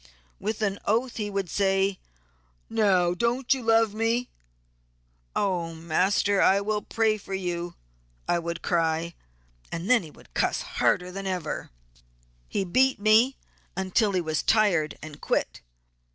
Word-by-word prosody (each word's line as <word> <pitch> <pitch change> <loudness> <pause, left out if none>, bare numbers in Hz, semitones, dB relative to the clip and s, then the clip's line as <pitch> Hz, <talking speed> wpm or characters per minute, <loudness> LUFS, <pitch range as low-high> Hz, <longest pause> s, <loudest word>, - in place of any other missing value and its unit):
With 215 +2 -3
an 200 -1 0
oath 235 +4 0
he 210 -2 -2
would 195 -2 -2
say, 195 +1 +1 0.7
'now 190 -6 +3
don't 235 +7 +1
you 265 - -4
love 225 -2 +3
me?' 230 +3 0 1.1
'Oh 175 -4 -1
master, 190 +5 +1
I 195 +1 +5
will 210 +1 -1
pray 220 -1 +1
for 195 -1 -5
you, 175 -2 -3 0.5
I 175 - +2
would 170 0 -5
cry, 165 -1 0 0.6
then 205 +8 +2
he 165 - -10
would - - -19
'cuss' - - 0 0.2
harder 180 0 +2
than 195 +1 -5
ever.' 180 -4 -3 0.8
He 195 - -1
beat 260 +7 +3
me 220 +5 +4 0.4
until 190 +2 +1
he 185 - +1
was 155 -2 -1
tired 190 -9 +2
and 155 -2 -10
quit. - - -1
195 Hz, 140 wpm, -26 LUFS, 175-220 Hz, 1.1 s, I